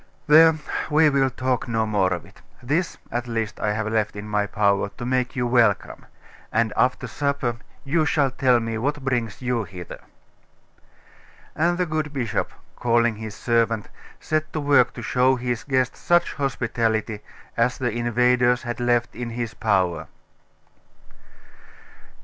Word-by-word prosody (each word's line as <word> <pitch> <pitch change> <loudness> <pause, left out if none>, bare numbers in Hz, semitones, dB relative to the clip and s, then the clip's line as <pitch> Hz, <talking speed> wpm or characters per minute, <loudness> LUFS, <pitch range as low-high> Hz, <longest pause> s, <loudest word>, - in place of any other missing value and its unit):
There, 160 +1 +7 0.3
we 155 0 +4
will 135 -1 +2
talk 130 -1 -2
no 115 -1 0
more 100 -4 +1
of 90 -1 -3
it. - - -19 0.2
This, 155 +8 -1
at 120 +1 -3
least, 115 -2 -3
I 105 - 0
have 110 0 -2
left 110 -1 -1
in 105 +1 -7
my 105 -1 0
power, 100 -1 +1
to 120 - -5
make 125 +1 -1
you 125 -1 0
welcome. 120 -4 +1 0.4
And 115 -1 +1
after 125 +1 +1
supper 130 -1 -2 0.3
you 155 +2 +1
shall 140 -4 +2
tell 125 -1 +3
me 115 -1 -3
what 140 +3 -2
brings 120 -3 -2
you 125 -2 0
hither.' 90 -1 -9 1.5
And 175 +2 +1
the 180 - +1
good 155 -2 -3
bishop, 120 -6 -2 0.2
calling 120 -2 +2
his 110 -1 -7
servant, 115 -2 0 0.3
set 155 0 -2
to 155 - -1
work 140 -4 +3
to 120 - -8
show 130 +3 +3
his 125 -1 -3
guest 130 -3 0
such 175 0 +2
hospitality 115 -6 -1 0.4
as 120 +2 +1
the 125 -2 -1
invaders 120 +1 +2
had 120 -1 -4
left 120 -1 +1
in 120 +1 -5
his 115 -1 -4
power. 95 -7 0
120 Hz, 150 wpm, -23 LUFS, 110-130 Hz, 1.5 s, There